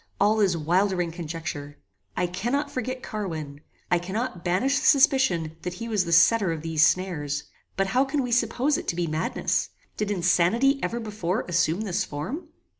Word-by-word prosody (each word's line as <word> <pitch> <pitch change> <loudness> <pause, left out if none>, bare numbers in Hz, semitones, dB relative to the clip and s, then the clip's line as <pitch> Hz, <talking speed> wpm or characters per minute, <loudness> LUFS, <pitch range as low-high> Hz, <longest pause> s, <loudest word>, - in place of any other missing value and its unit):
All 210 +2 +3
is 190 -5 +3
wildering 175 +2 +1
conjecture. 160 -3 -6 0.4
I 180 - +2
cannot 240 +12 -2
forget 255 -1 -4
Carwin. 155 -9 -5 0.3
I 175 - +4
cannot 190 +1 -4
banish 195 +11 +1
the - - -4
suspicion 260 - +3
that 180 0 -5
he 230 +5 -6
was 210 -5 +1
the 170 - -4
setter 190 +3 +5
of 160 -1 -4
these 160 -1 +2
snares. 150 -6 +1 0.3
But 195 - +2
how 260 +2 +4
can 275 0 -1
we 245 - -4
suppose 245 +4 +1
it - - -9
to - - -1
be 175 0 0
madness? 155 +1 -1 0.3
Did 210 -1 -1
insanity 205 +8 +2
ever 235 - -2
before 210 -2 -2
assume 175 +1 +1
this 195 -5 -1
form?" 225 - -5
185 Hz, 175 wpm, -25 LUFS, 170-235 Hz, 0.4 s, setter